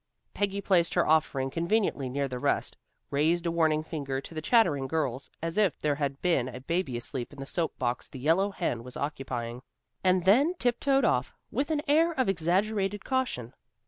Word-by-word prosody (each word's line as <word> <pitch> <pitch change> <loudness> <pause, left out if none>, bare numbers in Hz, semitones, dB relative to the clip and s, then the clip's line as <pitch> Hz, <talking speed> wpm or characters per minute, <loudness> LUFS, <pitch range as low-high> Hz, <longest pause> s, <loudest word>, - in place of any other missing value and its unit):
Peggy 200 0 -1
placed 180 -4 +2
her - - +3
offering 140 -4 +2
conveniently 170 - 0
near 140 +2 -1
the 125 -1 -5
nest, - - 0 0.4
raised 160 +5 +2
a 170 - +1
warning 160 -2 +2
finger 140 -4 -3
to 140 - -10
the 155 - -4
chattering 150 - +3
girls, 140 -4 -2
as 165 +5 -1
if 195 -8 +2
there 150 -1 0
had 140 -1 -3
been 165 -9 +2
a 125 0 -8
baby 135 -2 -2
asleep 120 +1 -3
in 145 - -13
the 135 - -5
soap 165 +3 -2
box 120 -1 -2
the - - -9
yellow 165 +9 +2
hen 120 - -2
was 125 +1 -9
occupying, 125 -4 -4 0.4
and 185 -1 +3
then 275 - +5
tiptoed 270 0 +2
off, 125 - +1 0.2
with 275 +6 -1
an 300 -2 0
air 325 +4 +4
of 260 -5 0
exaggerated 195 +3 0
caution. 255 - -1
160 Hz, 185 wpm, -28 LUFS, 135-200 Hz, 0.4 s, then